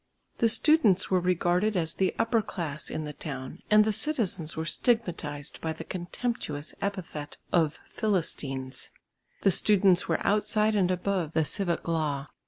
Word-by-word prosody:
The 230 - +4
students 225 - +4
were 185 - +4
regarded 180 +3 +1
as 165 -2 -1
the 190 -1 0
upper 230 0 +2
class 155 -7 -5
in 155 - -4
the 150 0 -6
town 135 -4 -7
and 215 0 +6
the 215 - +1
citizens 210 - 0
were 160 - -2
stigmatised 160 - -1
by 160 -1 -2
the 160 - -8
contemptuous 175 -4 -4
epithet 175 -7 -5 0.2
of 160 -3 +2
"Philistines." 135 -10 -2 0.5
The 195 - +5
students 190 -2 +4
were - - -1
outside 215 +1 +2
and 190 -4 +2
above 180 -3 -1
the 160 - +2
civic 175 0 -1
law. 150 -4 -1
180 Hz, 150 wpm, -28 LUFS, 155-210 Hz, 0.5 s, and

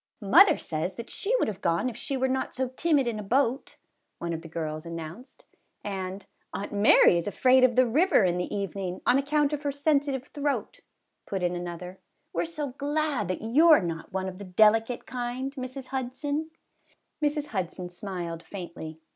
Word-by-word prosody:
"Mother 340 - +7
says 160 +3 -3
that 235 0 -8
she 455 +5 0
would - - +2
have 205 -2 -5
gone 170 +8 +1
if 245 - -4
she 270 +3 -3
were 265 0 +1
not 260 0 -2
so 260 -1 -1
timid 280 0 +1
in 225 -3 -2
a - - -5
boat," 255 +4 0 0.4
one 170 0 -3
of 165 - -4
the 165 - -10
girls 155 -1 -4
an 170 0 -6
nounced; 170 - -10 0.4
and 190 -1 -5
" - - -44
Aunt 200 - -5
Mary 200 -3 +6
is 170 - -2
afraid 255 +5 +4
of 250 -2 +4
the 255 0 +5
river 285 - +4
in 180 -1 +1
the 180 - -3
evening, 195 -2 -3
on 260 - +5
account 295 +1 +1
of 295 - -2
her 290 -1 -1
sensitive 280 -2 0
throat," 290 -1 -2 0.5
put 190 -2 -3
in 175 0 +1
another; 175 +1 -6 0.2
" - - -48
we - - 0
're - - -1
so 305 -4 -4
glad 285 - -1
that 185 +3 -3
you 285 +10 +5
're 310 - +9
not 165 -4 -5
one 190 0 -2
of 185 0 -7
the - - -6
delicate 220 +5 +3
kind, 255 +2 -4
Mrs. 260 -1 -7
Hudson." 270 +4 -3 0.7
Mrs. 295 0 0
Hudson 185 - -3
smiled 175 -2 -5
faintly. 170 -4 -8
230 Hz, 195 wpm, -27 LUFS, 180-275 Hz, 0.7 s, re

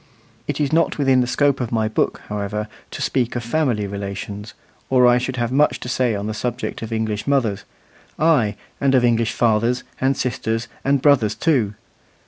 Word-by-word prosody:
It - - -2
is 145 0 0
not 165 -1 +2
within 135 -3 +3
the 125 - 0
scope 140 +1 +2
of 120 - -3
my 110 -2 +1
book, 110 - -1
however, 105 +1 -3 0.2
to - - -5
speak 125 -3 0
of 120 - -2
family 120 -4 0
relations, 100 +1 -6 0.3
or 125 -1 +5
I 125 0 +5
should 130 +1 -3
have 120 -1 -1
much 145 +3 +3
to - - -6
say 125 -3 +1
on 100 0 -4
the 110 - -2
subject 120 +2 -3
of 115 0 -6
English 110 -1 -2
mothers 120 -8 +1 0.5
ay, 140 -10 +3 0.2
and 135 -1 +3
of 125 -1 +4
English 115 -1 +2
fathers, 120 +2 +1 0.2
and 135 0 +2
sisters, 115 -1 -2 0.2
and 140 -1 +1
brothers 130 -8 +4
too. 125 -11 +1
120 Hz, 185 wpm, -21 LUFS, 110-135 Hz, 0.5 s, or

